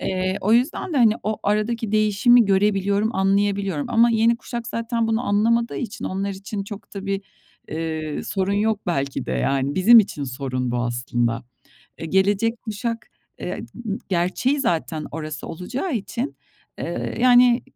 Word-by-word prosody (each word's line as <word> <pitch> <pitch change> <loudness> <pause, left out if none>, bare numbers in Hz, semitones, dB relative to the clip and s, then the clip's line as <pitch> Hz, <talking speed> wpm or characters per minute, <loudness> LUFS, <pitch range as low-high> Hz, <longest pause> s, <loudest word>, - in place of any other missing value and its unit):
Eee, 185 0 -1
o 210 +3 +1
yüzden 255 +8 +1
de, - - -1
hani, 225 -4 +5
o 215 0 -2
aradaki 215 +1 0
değişimi 215 +3 +5
görebiliyorum, 200 +2 +1
anlayabiliyorum. 195 -4 +1
Ama 235 +1 +5
yeni 230 +1 +3
kuşak 235 -2 -6
zaten 230 -1 -1
bunu 225 +2 0
anlamadığı 230 +3 +2
için 230 -5 -5
onlar 195 +1 -2
için 195 +1 -5
çok 205 0 -10
da 195 0 -6
bir, 195 0 -1 0.5
eee, 160 -1 -3
sorun 195 0 -1
yok 210 0 +1
belki 140 -5 -2
de, 65 - -2
yani 135 - 0
bizim 225 +5 +8
için 150 -9 +1
sorun 130 -1 -3
bu 120 - -1
aslında. 120 -1 -1 0.5
Eee, 165 - -5
gelecek 205 +6 +1
kuşak, 230 +1 -4 0.3
eee, - - -4 0.5
gerçeği 190 +10 +1
zaten 160 - -1
orası 155 -1 -6
olacağı 250 - -4
için, 235 +5 -3 0.4
eee, - - -4
yani 245 -1 +6
200 Hz, 150 wpm, -22 LUFS, 165-230 Hz, 0.5 s, bizim